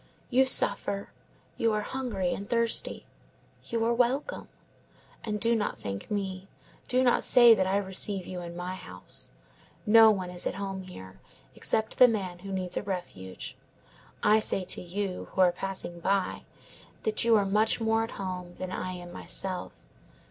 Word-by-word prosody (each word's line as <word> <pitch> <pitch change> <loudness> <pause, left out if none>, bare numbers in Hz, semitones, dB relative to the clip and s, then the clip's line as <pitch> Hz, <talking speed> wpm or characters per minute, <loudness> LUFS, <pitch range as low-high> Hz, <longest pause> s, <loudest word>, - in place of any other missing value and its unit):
You 260 +1 +4
suffer, 200 -5 +4 0.5
you 230 -1 +2
are 210 - 0
hungry 215 -8 -2
and 200 - -7
thirsty; 230 -1 0 0.6
you 230 -1 0
are 235 - +2
welcome. 255 - 0 0.8
And 210 -2 -3
do 230 +2 +2
not 210 -2 -1
thank 100 -1 -6
me; 195 -2 -3 0.4
do 255 +1 +2
not 245 - +3
say 240 -2 +8
that 190 -4 +1
I 195 +1 +2
receive 190 -1 0
you 180 -1 -6
in 170 0 -8
my 180 +1 -4
house. 90 - -9 0.6
No 225 +1 +8
one 185 -4 -1
is 175 0 -4
at - - -3
home 195 -1 -4
here, 95 - -11 0.3
except 220 0 -1
the 250 - +10
man 190 -6 -2
who 195 +2 -8
needs 185 -2 -2
a - - 0
refuge. 175 - -6 0.7
I 215 +1 +5
say 195 -3 0
to 185 - -1
you, 185 +1 -4
who 190 - +1
are 180 -1 +6
passing 180 -1 -5
by, 190 +1 -1 0.6
that 215 0 0
you 230 -1 +5
are 200 - +2
much 210 +4 +2
more 225 0 +1
at 225 - -5
home 185 -3 -4
here 175 - -16
than 185 0 -5
I 185 0 -4
am 175 -1 -9
myself. 185 -1 -4
195 Hz, 170 wpm, -28 LUFS, 180-225 Hz, 0.8 s, the